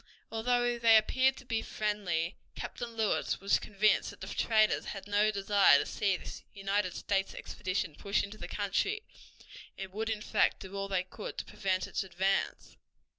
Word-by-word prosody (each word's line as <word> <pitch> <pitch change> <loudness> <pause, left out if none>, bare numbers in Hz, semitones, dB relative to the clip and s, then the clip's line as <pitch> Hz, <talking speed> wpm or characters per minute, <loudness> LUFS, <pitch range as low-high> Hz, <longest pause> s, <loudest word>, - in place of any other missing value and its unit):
Although 240 +1 +1
they 225 -1 +7
appeared 260 +4 +3
to 265 - -12
be 230 -2 -1
friendly, 195 -7 -1 0.2
Captain 235 -1 -6
Lewis 220 -2 0
was 200 +1 +2
convinced 210 +1 +2
that - - -12
the - - -6
traders 215 -2 +2
had 195 -2 -6
no 205 +1 +3
desire 200 -1 +5
to - - 0
see 195 -3 0
this - - -8
United 195 -1 -1
States 195 -1 -1
expedition 185 -4 -3
push 200 +6 0
into 205 +2 -7
the - - -6
country, 315 - -1 0.7
and 190 -1 -7
would 220 +2 -2
in 215 -1 -2
fact - - +2
do 190 +1 -8
all 195 0 -2
they 190 -2 0
could 185 +3 -8
to - - -4
prevent 185 -2 -1
its - - -2
advance. 190 +1 -1
205 Hz, 175 wpm, -31 LUFS, 195-220 Hz, 0.7 s, they